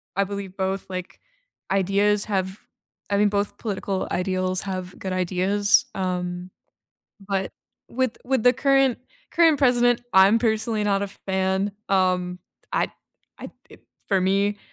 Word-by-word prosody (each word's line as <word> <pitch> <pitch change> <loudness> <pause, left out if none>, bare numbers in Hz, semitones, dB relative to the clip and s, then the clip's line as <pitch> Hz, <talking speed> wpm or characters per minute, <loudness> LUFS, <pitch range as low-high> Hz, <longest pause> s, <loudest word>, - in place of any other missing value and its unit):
I 200 - +2
believe 200 -1 -6
both, 190 0 -2
like, 185 -1 -6 0.5
ideas 200 +2 +2
have 190 -1 -2 0.5
I 200 - +1
mean, 205 0 +4
both 200 0 -2
political 195 -3 -3
ideals 185 0 -1
have 185 -2 -5
good 190 -1 -4
ideas, 185 +3 +2
um, 180 -1 -3 0.8
but 195 -1 -1 0.4
with 255 -1 -1
with 260 -2 +1
the 245 - +7
current 270 -1 +2 0.3
current 325 -3 +4
president, 245 -3 +3
I'm 195 +4 +6
personally 220 -1 0
not 200 -1 +1
a 200 - -2
fan, 190 +1 -1 0.2
um, 185 -2 +1 0.3
I'd - - +1 0.5
I'd - - -8 0.2
d - - -15 0.3
for 195 -2 +2
me 200 +2 +1
195 Hz, 135 wpm, -24 LUFS, 185-210 Hz, 0.8 s, the